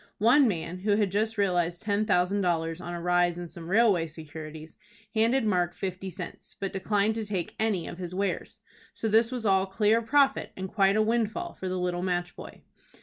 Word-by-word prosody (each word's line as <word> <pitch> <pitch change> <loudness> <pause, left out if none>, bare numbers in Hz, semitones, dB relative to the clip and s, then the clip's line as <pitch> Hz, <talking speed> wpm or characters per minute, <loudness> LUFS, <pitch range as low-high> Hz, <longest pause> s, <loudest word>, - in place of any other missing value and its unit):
One 250 +6 +5
man, 175 -2 -3
who 205 +2 +2
had 205 -3 +1
just 220 +2 0
realized 175 -3 0
ten 210 0 +1
thousand 190 +1 +2
dollars 165 -2 -1
on 175 0 -5
a - - -4
rise 175 0 +2
in 175 -1 -6
some 165 0 -9
railway 200 -5 +4
securities, 155 0 -9 0.4
handed 230 +3 +2
Mark 180 -4 +1
fifty 190 0 -4
cents, 175 - -8
but 195 - -3
declined 205 +2 +1
to 225 0 -3
take 200 -5 -3
any 210 -6 0
of 170 - -8
his 180 0 -5
wares. 200 +1 -2 0.4
So 225 - -2
this 225 +2 +4
was 245 -3 -4
all 190 -1 +3
clear 215 +3 +2
profit 275 +4 +2
and 190 0 -4
quite 195 0 +2
a 215 - +4
windfall 230 +9 -1
for 190 - -5
the 185 - -2
little 180 -1 -1
match 180 -1 -2
boy. - - -11
190 Hz, 200 wpm, -28 LUFS, 175-220 Hz, 0.4 s, One